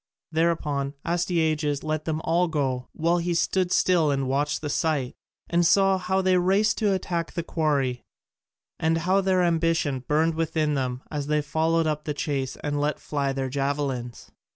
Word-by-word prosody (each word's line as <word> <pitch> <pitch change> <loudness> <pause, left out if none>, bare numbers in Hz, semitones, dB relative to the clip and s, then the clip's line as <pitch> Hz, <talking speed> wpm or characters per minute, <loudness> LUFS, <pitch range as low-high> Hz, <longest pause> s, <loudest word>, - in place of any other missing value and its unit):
Thereupon 150 -4 0
Astyages 160 -4 0
let 155 0 -2
them 160 -1 -2
all 175 +2 +2
go, 135 -5 -1
while 170 +2 +1
he 170 0 -1
stood 180 +2 +1
still 175 -5 +3
and 135 -2 0
watched 145 +2 0
the 155 - -3
sight, 150 -7 0 0.3
and 170 0 +2
saw 195 +2 +4
how 190 +1 0
they 185 -1 +3
raced 195 +4 +2
to 210 -3 +2
attack 175 -3 -2
the 170 - -3
quarry 140 -7 0 0.8
and 160 0 +2
how 190 +2 +3
their 185 -1 +2
ambition 165 -5 +1
burned 155 +5 +1
within 160 -1 0
them 130 -2 -2
as 145 -2 -3
they 150 0 +1
followed 160 +2 +1
up 150 -1 -2
the 150 - -2
chase 135 -3 -2
and 145 0 -1
let 150 +1 0
fly 140 -2 -2
their 135 0 -2
javelins. 135 -3 -3
155 Hz, 170 wpm, -25 LUFS, 145-170 Hz, 0.8 s, saw